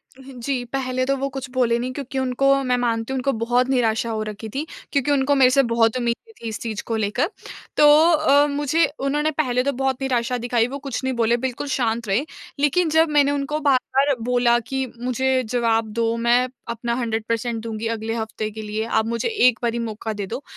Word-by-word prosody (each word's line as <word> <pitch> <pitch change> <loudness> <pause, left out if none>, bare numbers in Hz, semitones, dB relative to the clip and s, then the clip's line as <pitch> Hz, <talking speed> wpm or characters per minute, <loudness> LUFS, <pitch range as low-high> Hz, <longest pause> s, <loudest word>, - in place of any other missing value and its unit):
हाँ 265 +1 -13
जी। 255 0 -2
पहले 255 -1 -1
तो 275 +1 +1
वो 275 +1 -1
कुछ 270 -1 -6
बोले 240 -2 +2
नहीं, 250 +2 -3
क्योंकि 270 -1 -4
उनको, 265 +1 +2
मैं 250 -1 +1
मानती 230 0 -1
हूँ, - - -1
उनको 265 +2 0
बहुत 245 +2 +2
निराशा 235 -3 +1
हो 220 -1 -2
रखी 215 +1 -7
थी, 275 +8 -3 0.3
क्योंकि 280 0 +1
उनको 285 0 +2
मेरे 265 -2 +6
से 275 +1 +4
बहुत 230 -1 +2
उम्मीदें 240 - -3
थी 230 - -5
इस 220 -1 -4
चीज़ 220 -3 -4
को 230 - -2
लेकर। 220 - 0 0.5
तो 300 - +6 0.3
अ, 295 -2 +4
मुझे 290 +3 +1
उन्होंने 295 +3 0
पहले 250 -5 0
तो 280 - +1
बहुत 265 0 -2
निराशा 250 -2 0
दिखाई, 240 -1 +1
वो 270 +3 -5
कुछ 275 -2 -5
नहीं 260 0 0
बोले, 235 0 +2
बिल्कुल 260 +3 -4
शांत 235 -4 -1
रहे। 205 +9 +1 0.3
लेकिन 305 +4 +2
जब 320 +1 +3
मैंने 285 -1 +3
उनको 285 +1 -2
बार-बार 275 0 +2
बोला 240 0 +3
कि, 265 +3 -3
"मुझे 255 +1 0
जवाब 230 -2 +1
दो, 230 0 0
मैं 240 +2 +3 0.2
अपना 235 0 -2
100% 230 0 -2
दूँगी 225 0 -4
अगले 225 0 -3
हफ़्ते 220 -1 -3
के 220 +1 -7
लिए। 215 +1 -3
आप 220 -1 +1
मुझे 230 - -1
एक 250 - +3
बारी 235 0 0
मौका 220 -1 -4
दे 205 -1 -4
दो।" 240 +7 -5
250 Hz, 205 wpm, -22 LUFS, 230-275 Hz, 0.5 s, मेरे